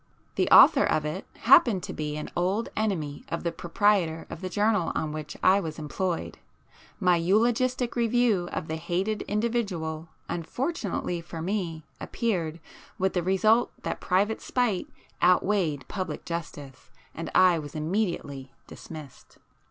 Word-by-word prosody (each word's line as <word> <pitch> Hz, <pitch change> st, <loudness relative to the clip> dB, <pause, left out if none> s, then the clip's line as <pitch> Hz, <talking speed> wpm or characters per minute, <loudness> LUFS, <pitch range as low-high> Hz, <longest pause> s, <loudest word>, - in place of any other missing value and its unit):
The -, -, 0 dB
author -, -, +8 dB
of 155 Hz, -, +1 dB
it 150 Hz, -, -4 dB
happened 230 Hz, -, +5 dB
to -, -, -5 dB
be 150 Hz, -1 st, -4 dB
an 150 Hz, -, -6 dB
old 190 Hz, +6 st, 0 dB
enemy 165 Hz, -10 st, -2 dB
of 170 Hz, -, -3 dB
the 170 Hz, -, 0 dB
proprietor 170 Hz, -1 st, +1 dB
of 165 Hz, -, -7 dB
the 185 Hz, -, -4 dB
journal 205 Hz, -2 st, +1 dB
on 155 Hz, -, -1 dB
which 150 Hz, -1 st, -6 dB
I 190 Hz, +2 st, +6 dB
was 160 Hz, -5 st, -5 dB
employed;—my 180 Hz, +2 st, -3 dB
eulogistic 235 Hz, +7 st, +1 dB
review 235 Hz, -6 st, +2 dB
of 155 Hz, -, -4 dB
the 160 Hz, -, -3 dB
hated 185 Hz, +6 st, -2 dB
individual, 195 Hz, -8 st, -2 dB, 0.2 s
unfortunately 180 Hz, -, -3 dB
for 170 Hz, -1 st, -8 dB
me, 170 Hz, -3 st, -3 dB, 0.2 s
appeared, 170 Hz, -9 st, -2 dB, 0.4 s
with 190 Hz, 0 st, 0 dB
the 180 Hz, -, +1 dB
result 210 Hz, +6 st, +3 dB
that -, -, -4 dB
private 200 Hz, +4 st, +1 dB
spite 240 Hz, -7 st, 0 dB, 0.3 s
outweighed 180 Hz, -5 st, +2 dB
public 185 Hz, -6 st, -5 dB
justice, 150 Hz, -5 st, -7 dB, 0.2 s
and -, -, -5 dB
I 180 Hz, -3 st, +5 dB
was 145 Hz, -1 st, -9 dB
immediately 155 Hz, -6 st, -2 dB
dismissed. 155 Hz, -5 st, -11 dB
180 Hz, 135 wpm, -27 LUFS, 160-210 Hz, 0.4 s, author